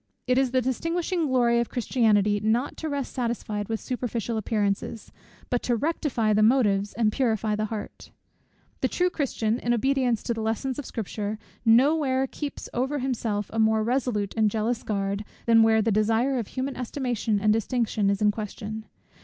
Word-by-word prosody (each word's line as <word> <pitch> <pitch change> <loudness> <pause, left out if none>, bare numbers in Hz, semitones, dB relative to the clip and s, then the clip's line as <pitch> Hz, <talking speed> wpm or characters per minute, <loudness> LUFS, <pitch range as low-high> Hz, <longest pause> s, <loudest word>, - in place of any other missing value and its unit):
It 255 +1 +3
is 265 -1 +2
the 255 0 +1
distinguishing 330 +6 -1
glory 240 -3 +3
of 235 - -1
Christianity 210 -4 +2
not 225 +6 0
to 320 - -4
rest 285 -2 -3
satisfied 230 -4 -3
with 225 -1 -1
superficial 240 -3 -3
appearances, 215 0 -2 0.4
but 245 - +1
to 240 - +1
rectify 245 -5 0
the 210 - +3
motives, 210 -4 +3
and 220 -2 +2
purify 220 -4 0
the 215 0 -1
heart. 215 -1 -7 0.7
The - - +1
true 360 0 +1
Christian, 235 -7 -1
in 240 0 +1
obedience 255 -2 +1
to 235 - -1
the 225 - -4
lessons 230 +5 -2
of 290 - -6
Scripture, 210 -1 -4 0.3
no 250 +7 +6
where 265 -4 +1
keeps 285 +1 -6
over 265 +4 -1
himself 230 -6 -2
a 225 - -1
more 220 0 +3
resolute 235 -4 0
and 220 -2 +3
jealous 225 +3 -1
guard, 200 0 -2 0.2
than 230 -1 +6
where 220 -1 +4
the 225 - +1
desire 225 +5 +2
of 225 - -4
human 265 +1 -3
estimation 240 -4 -1
and 215 +1 +3
distinction 225 -2 0
is 200 +1 0
in 210 - +5
question. 215 +1 -6
230 Hz, 175 wpm, -26 LUFS, 215-260 Hz, 0.7 s, no